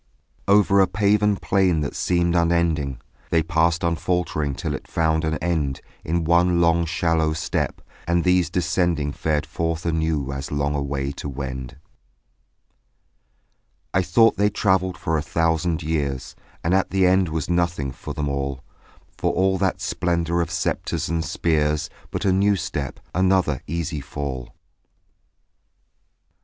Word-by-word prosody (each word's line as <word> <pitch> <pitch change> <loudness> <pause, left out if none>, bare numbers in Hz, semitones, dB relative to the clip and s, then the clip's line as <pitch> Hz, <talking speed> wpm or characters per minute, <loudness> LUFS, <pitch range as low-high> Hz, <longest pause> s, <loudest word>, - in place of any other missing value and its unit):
Over 100 0 +5
a 95 - +5
paven 105 +2 +2
plain 95 -6 +2
that 70 - -3
seemed 85 -1 +1
unending 85 -6 +1 0.3
They 80 -1 +2
passed 85 +2 +1
unfaltering 85 -3 0
till - - -3
it - - -6
found 80 -1 +1
an 80 0 0
end 75 -6 0 0.2
In 85 +1 0
one 85 +1 +3
long 85 0 +3
shallow 80 -2 +1
step; 80 +2 -2 0.3
and 85 0 +2
these 90 -1 +3
descending 85 -4 0
Fared 75 -1 -1
forth 80 +2 -3
anew 80 -4 0
as 70 +1 -5
long 75 0 0
away 70 -1 -2
to 70 - -6
wend. 65 -1 -6 2.2
I 95 - +3
thought 115 +6 +4
they 105 0 +3
travelled 95 -3 +1
for 80 -1 0
a - - -2
thousand 80 +3 0
years; 70 -4 -2 0.3
And 85 - +1
at 95 0 +2
the 95 0 +2
end 90 -1 +3
was 80 -2 -2
nothing 85 -5 0
for - - -8
them 75 -1 -2
all, 70 -1 -3 0.6
For - - +1
all 95 0 +1
that 95 -2 0
splendour 85 -1 0
of 85 - -2
sceptres - - -2
and 85 0 0
of 85 - -5
spears, 75 -2 0 0.2
But - - -3
a 95 - +4
new 100 +2 +3
step, 80 -6 -4
another 95 -6 +2
easy 80 -2 -3
fall. 65 -3 -6
85 Hz, 145 wpm, -23 LUFS, 75-90 Hz, 2.2 s, Over